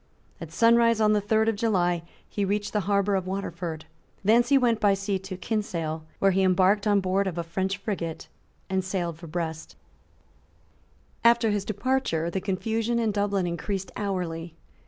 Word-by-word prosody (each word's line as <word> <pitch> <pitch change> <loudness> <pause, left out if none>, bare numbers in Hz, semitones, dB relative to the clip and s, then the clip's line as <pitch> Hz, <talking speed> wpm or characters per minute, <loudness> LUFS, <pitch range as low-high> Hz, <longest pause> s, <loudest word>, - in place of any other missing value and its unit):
At 165 -1 -7
sunrise 230 +3 +4
on 215 -1 +4
the 210 - +2
third 220 +2 +2
of 225 - +2
July 180 -6 +1 0.3
he 205 - -2
reached 205 +1 -1
the 210 - +2
harbour 200 0 +2
of 190 -1 0
Waterford. 175 -4 -4 0.4
Thence 235 +3 +4
he 280 - +6
went 235 -4 +2
by 205 -2 +4
sea 195 0 -2
to 190 0 -7
Kinsale, 170 -7 -3
where 195 - +3
he 190 +1 +2
embarked 190 +3 +3
on 205 -1 +4
board 190 +1 +1
of 175 -2 -4
a 170 - -1
French 190 +3 -2
frigate, 170 -6 -4 0.4
and 190 0 0
sailed 175 -3 -3
for 170 - -9
Brest, 160 -1 -4 1.5
After 235 -1 +5
his 205 -1 -1
departure 210 -7 -1
the 190 - -2
confusion 220 +4 -1
in 225 -2 +1
Dublin 200 -2 0
increased 185 +2 -3
hourly. 175 -5 -3
195 Hz, 170 wpm, -26 LUFS, 175-215 Hz, 1.5 s, he